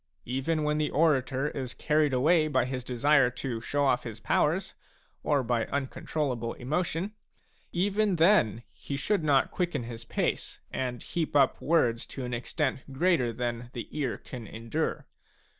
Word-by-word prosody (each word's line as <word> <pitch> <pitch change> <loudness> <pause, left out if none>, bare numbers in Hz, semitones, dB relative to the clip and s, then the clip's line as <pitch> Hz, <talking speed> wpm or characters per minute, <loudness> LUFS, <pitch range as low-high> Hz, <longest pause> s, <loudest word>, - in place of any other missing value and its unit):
Even 135 +6 -1
when 150 0 +1
the 150 - +1
orator 140 -2 +2
is 130 -4 -5
carried 150 -1 +2
away 155 +5 +4
by 150 - +2
his 130 -1 -4
desire 130 +2 +3
to 125 -2 -4
show 145 +4 0
ofF 125 -2 +3
his 115 -2 -7
powers, - - +1 0.5
or 145 -3 +2
by 120 -1 +1
uncontrollable 135 -3 -2
emotion, 170 +8 -2 0.6
even 200 +2 +1
then 160 - +4
he 140 - -5
should 185 +5 0
not 140 -3 +3
quicken 175 -8 -1
his 115 0 -7
pace 115 - -2
and 125 -2 -3
heap 165 -3 -3
up 135 -2 +4
words 120 -8 +2
to 130 - -6
an 125 - -4
extent 130 +4 -1
greater 135 -4 +2
than 120 0 -3
the 120 - -5
ear 140 -5 -2
can 120 -4 -9
endure. 115 +10 -3
135 Hz, 155 wpm, -29 LUFS, 120-155 Hz, 0.6 s, away